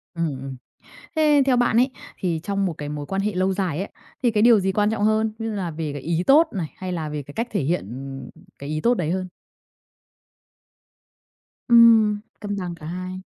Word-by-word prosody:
Ừm, 170 Hz, 0 st, 0 dB, 0.2 s
ừm. 135 Hz, -1 st, -6 dB, 0.6 s
Thế 300 Hz, -2 st, +4 dB
theo 255 Hz, -2 st, +3 dB
bạn 240 Hz, -2 st, +2 dB
ấy, 250 Hz, +3 st, +4 dB, 0.3 s
thì 170 Hz, -3 st, -1 dB
trong 200 Hz, 0 st, -1 dB
một 175 Hz, -, -1 dB
cái 145 Hz, 0 st, -5 dB
mối 145 Hz, -1 st, -5 dB
quan 195 Hz, +5 st, -2 dB
hệ 210 Hz, 0 st, -1 dB
lâu 185 Hz, +1 st, +1 dB
dài 185 Hz, -4 st, -2 dB
á, -, -, -7 dB, 0.4 s
thì 240 Hz, -, +3 dB
cái 210 Hz, -, +1 dB
điều 235 Hz, -3 st, +7 dB
gì 190 Hz, 0 st, 0 dB
quan 210 Hz, +1 st, +2 dB
trọng 220 Hz, -2 st, -1 dB
hơn? 215 Hz, 0 st, +2 dB
Như 225 Hz, -1 st, -3 dB
là 180 Hz, -4 st, -3 dB
về 155 Hz, -2 st, -4 dB
cái 145 Hz, -, -6 dB
ý 170 Hz, +4 st, -1 dB
tốt 310 Hz, +4 st, +6 dB
này, 180 Hz, -6 st, -2 dB
hay 185 Hz, -1 st, -5 dB
là 160 Hz, -4 st, -3 dB
về 150 Hz, -1 st, -4 dB
cái 145 Hz, -, -12 dB
cách 230 Hz, +2 st, -2 dB
thể 200 Hz, -, 0 dB
hiện, 160 Hz, -, -1 dB
ừm, 135 Hz, +2 st, -7 dB, 0.3 s
cái 140 Hz, +1 st, -7 dB
ý 155 Hz, 0 st, -2 dB
tốt 240 Hz, -, +3 dB
đấy 170 Hz, -7 st, -1 dB
hơn? 185 Hz, 0 st, -2 dB, 2.4 s
Ừm, 225 Hz, -3 st, +6 dB, 0.2 s
cân 205 Hz, -1 st, -4 dB
bằng 180 Hz, -2 st, -4 dB
cả 155 Hz, -2 st, -12 dB
hai. 185 Hz, +2 st, -5 dB
185 Hz, 215 wpm, -23 LUFS, 160-220 Hz, 2.4 s, điều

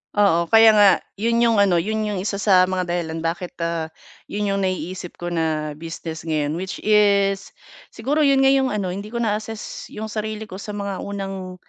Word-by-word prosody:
Oo, 195 Hz, -5 st, +4 dB
kaya 225 Hz, -1 st, +7 dB
nga 205 Hz, -1 st, +7 dB, 0.3 s
'yon 230 Hz, +4 st, +1 dB
yung 235 Hz, -1 st, +4 dB
ano 200 Hz, -4 st, +4 dB
'yon 215 Hz, +5 st, -1 dB
yung 210 Hz, -3 st, -2 dB
isa 200 Hz, +2 st, -2 dB
sa 190 Hz, -2 st, +4 dB
mga 185 Hz, 0 st, -1 dB
dahilan 170 Hz, -2 st, -3 dB
bakit, 175 Hz, +2 st, -3 dB
ah, 165 Hz, -1 st, -2 dB, 0.4 s
'yon 210 Hz, -, -3 dB
yung 200 Hz, -1 st, 0 dB
naiisip 185 Hz, -1 st, -3 dB
ko 175 Hz, 0 st, -5 dB
na 160 Hz, -2 st, -1 dB
business 165 Hz, 0 st, -7 dB
ngayon 150 Hz, -2 st, 0 dB
which 190 Hz, +1 st, -6 dB
is 200 Hz, -2 st, +2 dB, 0.4 s
siguro 270 Hz, +7 st, -1 dB
'yon 275 Hz, -2 st, +4 dB
nga 270 Hz, -, +6 dB
yung 270 Hz, -1 st, +3 dB
ano 200 Hz, -6 st, -2 dB
hindi 200 Hz, +3 st, -6 dB
ko 235 Hz, +2 st, -3 dB
na-assess 215 Hz, 0 st, -4 dB
yung 220 Hz, 0 st, -7 dB
sarili 215 Hz, 0 st, -4 dB
ko 190 Hz, -, -7 dB
sa 210 Hz, 0 st, -6 dB
mga 200 Hz, -2 st, -4 dB
unang 195 Hz, -2 st, -5 dB
200 Hz, 190 wpm, -22 LUFS, 175-215 Hz, 0.4 s, kaya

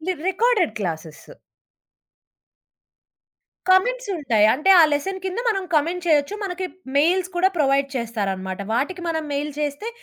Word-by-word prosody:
ఇది 370 Hz, +4 st, -2 dB, 0.2 s
recorded 430 Hz, -, +2 dB
classes. 160 Hz, -, -6 dB, 2.4 s
Comments -, -, +2 dB
ఉంటాయి. 230 Hz, -8 st, +2 dB
అంటే, 305 Hz, +8 st, +1 dB
ఆ -, -, +8 dB
లెసన్ 380 Hz, +7 st, -2 dB
కింద 375 Hz, +3 st, -3 dB
మనం 390 Hz, -3 st, -1 dB
కామెంట్ 340 Hz, +4 st, 0 dB
చేయొచ్చు. 305 Hz, +4 st, +2 dB
మనకి 370 Hz, 0 st, -3 dB, 0.3 s
మెయిల్స్ 355 Hz, +5 st, +2 dB
కూడా 375 Hz, +2 st, +4 dB
ప్రొవైడ్ 275 Hz, -1 st, +2 dB
చేస్తారనమాట. 195 Hz, -5 st, -3 dB
వాటికి 345 Hz, +9 st, -2 dB
మనం 320 Hz, -1 st, -2 dB
మెయిల్ 290 Hz, +1 st, -2 dB
చేస్తే 295 Hz, +9 st, -3 dB
315 Hz, 125 wpm, -22 LUFS, 265-375 Hz, 2.4 s, ఆ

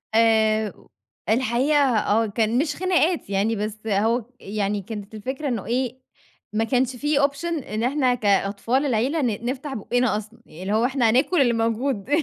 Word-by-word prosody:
آآ 220 Hz, -1 st, +3 dB
و -, -, -21 dB, 0.4 s
الحقيقة 255 Hz, +5 st, +2 dB, 0.2 s
آه. 215 Hz, +2 st, +2 dB
كان 220 Hz, +2 st, 0 dB
مش 290 Hz, +1 st, 0 dB
خناقات 355 Hz, -, +1 dB
يعني 200 Hz, +3 st, +1 dB
بس 215 Hz, +1 st, -5 dB
أهو، 220 Hz, +3 st, +1 dB
يعني 205 Hz, 0 st, -2 dB
كانت 210 Hz, +1 st, -8 dB
الفكرة 260 Hz, +7 st, -4 dB
إنه 235 Hz, -6 st, -2 dB
إيه، 250 Hz, +3 st, -2 dB, 0.5 s
ما 220 Hz, +1 st, +1 dB
كانش 255 Hz, +1 st, 0 dB
في 295 Hz, +3 st, 0 dB
option 280 Hz, +3 st, 0 dB, 0.2 s
إن 215 Hz, +2 st, -3 dB
إحنا 255 Hz, -1 st, +2 dB
كأطفال 210 Hz, +5 st, +1 dB
العيلة 265 Hz, +6 st, +1 dB
ن 235 Hz, -3 st, -2 dB
نفتح 270 Hz, +3 st, -3 dB
بوقّنا 245 Hz, 0 st, 0 dB
أصلًا، 215 Hz, 0 st, -9 dB
اللي 185 Hz, +6 st, -5 dB
هو 225 Hz, +3 st, +3 dB
إحنا 255 Hz, -3 st, +2 dB
هناكُل 270 Hz, +8 st, +3 dB
اللي 240 Hz, -3 st, +3 dB
موجود. 230 Hz, 0 st, -1 dB
230 Hz, 160 wpm, -23 LUFS, 215-265 Hz, 0.5 s, آآ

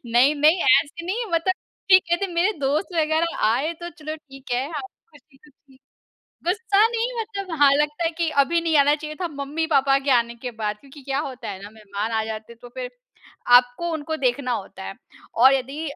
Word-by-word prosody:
नहीं-नहीं, 290 Hz, +8 st, +4 dB
ऐसे 290 Hz, +5 st, +3 dB
नहीं 455 Hz, +6 st, -2 dB
मतलब 335 Hz, +3 st, +2 dB, 0.4 s
कि 370 Hz, -, +10 dB
कहते, 345 Hz, +2 st, -1 dB
मेरे 355 Hz, +4 st, +1 dB
दोस्त 285 Hz, +6 st, 0 dB
वगैरह 315 Hz, +2 st, 0 dB
आएँ 275 Hz, +9 st, 0 dB
तो 345 Hz, -, -5 dB
चलो 310 Hz, 0 st, -5 dB
ठीक 270 Hz, -3 st, -15 dB
है। 255 Hz, +3 st, 0 dB
अ, 300 Hz, -3 st, -4 dB, 0.3 s
खुशी-खुशी 280 Hz, -2 st, -22 dB, 0.7 s
गुस्सा 415 Hz, +3 st, +3 dB
नहीं 470 Hz, +1 st, -2 dB
मतलब 400 Hz, -3 st, -6 dB
हाँ, 280 Hz, -1 st, +7 dB
लगता 300 Hz, +3 st, 0 dB
है 330 Hz, -, +2 dB
कि 335 Hz, -1 st, +1 dB
अभी 335 Hz, +5 st, 0 dB
नहीं 325 Hz, -2 st, +1 dB
आना 290 Hz, +1 st, +4 dB
चाहिए 305 Hz, 0 st, -7 dB
था 350 Hz, -, -1 dB
मम्मी-पापा 280 Hz, -1 st, +1 dB
के 275 Hz, 0 st, -2 dB
आने 235 Hz, -1 st, +2 dB
के 250 Hz, -, -2 dB
बाद 210 Hz, -1 st, -1 dB
क्योंकि 280 Hz, 0 st, -15 dB
क्या 270 Hz, -, 0 dB
होता 255 Hz, -1 st, -8 dB
है 190 Hz, +1 st, -8 dB
ना, 205 Hz, -, -9 dB
मेहमान 210 Hz, 0 st, -5 dB
आ 220 Hz, 0 st, 0 dB
जाते 220 Hz, +1 st, -7 dB
हैं 230 Hz, -, -18 dB
तो 245 Hz, -, -10 dB
फिर, -, -, -4 dB, 0.7 s
आपको 250 Hz, +8 st, -1 dB
उनको 315 Hz, 0 st, -3 dB
देखना 250 Hz, 0 st, 0 dB
होता 195 Hz, -3 st, -5 dB
है। -, -, -6 dB, 0.4 s
और 260 Hz, +3 st, +6 dB
यदि 270 Hz, +3 st, -3 dB
290 Hz, 190 wpm, -23 LUFS, 255-335 Hz, 0.7 s, कि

